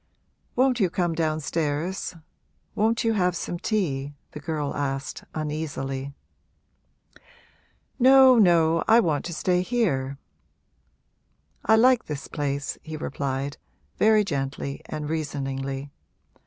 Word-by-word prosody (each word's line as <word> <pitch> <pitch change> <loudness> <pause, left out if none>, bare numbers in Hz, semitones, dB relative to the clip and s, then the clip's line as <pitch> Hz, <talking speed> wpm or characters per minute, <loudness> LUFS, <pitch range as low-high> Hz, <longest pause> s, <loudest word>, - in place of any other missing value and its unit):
'Won't 255 -1 +3
you 190 -4 +3
come 175 -1 0
downstairs? 160 +2 -2 0.6
won't 225 +3 +1
you 225 -1 +2
have 180 -4 +1
some 175 0 -4
tea?' 145 -11 -1 0.2
the 150 - -8
girl 150 -1 -3
asked, 135 -1 -3
uneasily. 140 -3 -4 1.8
'No, 260 -1 +7
no, 165 -4 +4
I 225 +1 +7
want 160 -9 0
to 175 - -4
stay 180 +1 +1
here 145 - 0 1.5
I 220 - +5
like 245 +1 +4
this 150 -2 -5
place,' 145 -1 -3
he 155 -2 -7
replied, 140 -1 -3 0.4
very 215 0 +5
gently 140 -4 -3
and 150 -1 -4
reasoningly. 140 -3 -3
155 Hz, 110 wpm, -25 LUFS, 140-195 Hz, 1.8 s, No